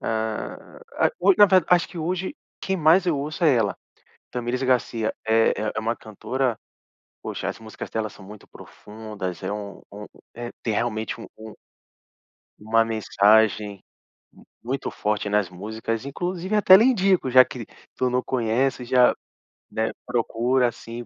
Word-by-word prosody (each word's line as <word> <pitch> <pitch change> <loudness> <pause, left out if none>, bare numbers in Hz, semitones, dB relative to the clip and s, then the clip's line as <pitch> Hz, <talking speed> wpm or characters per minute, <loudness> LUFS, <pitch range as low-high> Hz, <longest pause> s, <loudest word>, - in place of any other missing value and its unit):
ah, 110 -1 -4 0.3
a - - -1
hoi 195 +2 +5
na 205 - +9
verda 185 -1 +4
acho 175 -1 +3
que 170 - -9
hoje 180 +3 -3 0.3
quem 190 - -2
mais 165 +3 +4
eu 160 -5 +1
ouço 155 +5 -3
é 150 - +5
ela, 110 -4 +1 0.6
Thamires 125 +1 -3
Garcia, 125 -3 0
é 115 0 +4 0.2
é 110 - -2
uma 115 +1 -1
cantora 120 +3 -3 0.6
Poxa - - -4
as - - -7
músicas 110 -1 -9
dela 110 -1 -2
são 95 - -15
muito 105 +1 -13
profundas, 105 -5 -8
é - - -2
um 105 -1 -6
um 105 +1 -9 0.6
tem 110 - -1
realmente, 110 0 -2
um 115 - -9 1.3
uma 115 +2 +2
mensagem 105 -2 +2 0.8
muito 130 +3 -3
forte 105 0 -2
nas 105 -3 +1
músicas, 110 +5 -5
inclusive 180 +7 -3
até 190 -2 +8
lhe 225 - +4
indico, 195 - +2
já 130 0 +9
que 125 -3 -8 0.3
tu 130 -1 0
não 125 +1 +1
conhece, 125 +1 0
já, 125 0 +4 0.6
né, 110 0 -1
procura, 125 +1 +1
assim 115 +1 -9
115 Hz, 150 wpm, -24 LUFS, 110-140 Hz, 1.3 s, na